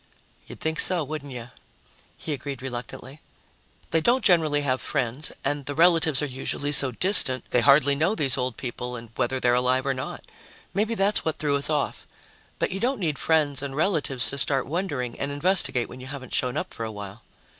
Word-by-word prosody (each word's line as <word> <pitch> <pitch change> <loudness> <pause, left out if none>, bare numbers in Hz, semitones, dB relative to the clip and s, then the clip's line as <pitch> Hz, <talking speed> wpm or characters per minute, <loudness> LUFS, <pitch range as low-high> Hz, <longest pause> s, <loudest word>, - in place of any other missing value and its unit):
"You'd - - -10
think 160 0 -2
so, 180 -3 +2
wouldn't 145 -1 -6
you?" 120 -1 -8 0.7
he 155 - -4
agreed 135 -1 -6
reluctantly. 130 +3 -7 0.7
"They 165 - +2
don't 240 +7 +2
generally 155 -5 +3
have 130 -2 -1
friends, 135 +1 -1
and 145 0 -2
the 145 - -3
relatives 165 -3 +4
are - - +1
usually 140 +1 -2
so 140 -2 +7
distant, 130 - +4
they 125 - +3
hardly 140 +1 +5
know 160 +9 +1
these 135 - 0
old 125 -2 -2
people 125 -1 -5
and 115 -2 -10
whether 130 +2 -1
they're 120 -1 +2
alive 125 +1 +2
or 135 - +1
not. 130 0 -6 0.5
Maybe 215 +4 0
that's 200 0 +1
what 160 - -2
threw 145 -2 0
us 140 +1 -3
off. 150 -2 -2 0.5
But - - -1
you 190 - -4
don't 255 +3 0
need 155 -6 -2
friends 150 -4 +1
and 140 -1 -5
relatives 150 -6 +1
to 140 - -4
start 135 -1 0
wondering, 145 -7 -3
and 140 +1 -3
investigate 145 -5 +1
when 125 - -11
you 130 - -9
haven't 135 -2 -8
shown 125 -1 +1
up - - -4
for 115 - -6
a 110 - -4
while." 100 -2 -9
140 Hz, 200 wpm, -25 LUFS, 130-160 Hz, 0.7 s, so